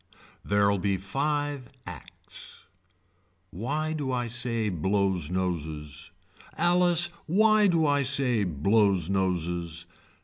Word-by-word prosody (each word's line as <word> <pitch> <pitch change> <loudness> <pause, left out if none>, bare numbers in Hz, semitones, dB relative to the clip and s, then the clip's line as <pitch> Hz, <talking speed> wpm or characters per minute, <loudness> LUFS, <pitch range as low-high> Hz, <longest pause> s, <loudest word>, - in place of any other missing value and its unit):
There'll 100 -1 +2
be 100 0 0
five 145 +6 -2 0.2
acts. 90 -4 -8 0.9
Why 145 - -2
do 145 -4 -3
I 125 -1 -1
say 115 -2 0
blows 95 -2 0
noses. 80 -4 -3 0.5
Alice 175 0 +3 0.2
why 215 +4 +4
do 165 -4 +2
I 145 -1 +2
say 130 -5 +2
blows 95 +2 +2
noses. 85 -3 -1
105 Hz, 100 wpm, -27 LUFS, 90-145 Hz, 0.9 s, why